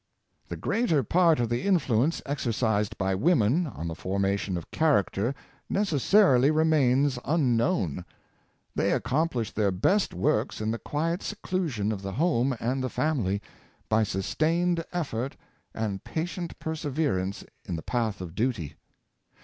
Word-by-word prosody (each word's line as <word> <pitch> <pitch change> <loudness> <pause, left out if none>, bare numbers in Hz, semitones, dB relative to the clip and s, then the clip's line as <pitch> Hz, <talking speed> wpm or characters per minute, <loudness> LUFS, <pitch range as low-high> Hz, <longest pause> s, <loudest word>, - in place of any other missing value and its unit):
The - - -5
greater 170 - +1
part 165 +3 +3
of 120 - +1
the 120 +1 0
influence 145 - +1
exercised 115 -6 -1
by 95 0 0
women 145 - +2
on 85 - -6
the 80 - -3
formation 95 +1 -1
of 85 - -8
character 130 -5 +1 0.3
necessarily 175 - +4
remains 145 -4 +3
un 140 -6 +2
known. 105 - 0 0.7
They - - +1
accomplish 130 -5 0
their 105 -2 +1
best 185 - +2
works 105 +6 0
in 110 0 -1
the 115 - -3
quiet 165 +4 -2
seclusion 165 - -2
of 100 -3 -4
the 95 0 -5
home 135 - +1
and 130 +3 -1
the 130 - -1
family, 110 -10 0 0.5
by 110 +1 +3
sustained 165 - 0
effort 135 -7 -3 0.3
and 105 -4 -3
patient 175 +2 -4
perseverance 145 - -2 0.2
in 90 - -3
the 80 - -6
path 110 -6 -1
of 85 -3 -7
duty. 105 - -1
125 Hz, 135 wpm, -27 LUFS, 105-160 Hz, 0.7 s, necessarily